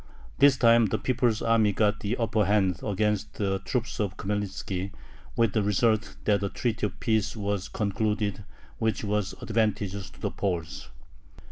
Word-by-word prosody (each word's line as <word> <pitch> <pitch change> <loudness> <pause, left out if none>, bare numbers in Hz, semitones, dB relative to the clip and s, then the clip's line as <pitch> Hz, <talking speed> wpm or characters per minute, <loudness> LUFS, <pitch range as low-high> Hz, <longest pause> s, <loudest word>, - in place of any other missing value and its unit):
This 140 -1 +6
time 115 -2 +5
the - - 0
people's 120 -3 0
army 110 -3 +3
got 105 +1 +2
the 105 +4 -2
upper 110 -2 +1
hand 95 -3 +2
against 105 0 -1
the 95 -2 -1
troops 120 +4 -3
of 100 -3 -2
Khmelnitzki, 100 -1 -3 0.5
with 115 -3 +2
the 110 - +2
result 105 +1 +1
that 100 -2 +3
a 100 - -1
treaty 110 +1 -1
of 100 - -12
peace 110 -1 0
was 100 -2 -2
concluded 105 -1 -1 0.4
which 110 -1 0
was 105 -1 -1
advantageous 105 -4 -1
to - - -18
the - - -2
Poles. 85 -9 -3
105 Hz, 155 wpm, -27 LUFS, 100-110 Hz, 0.5 s, This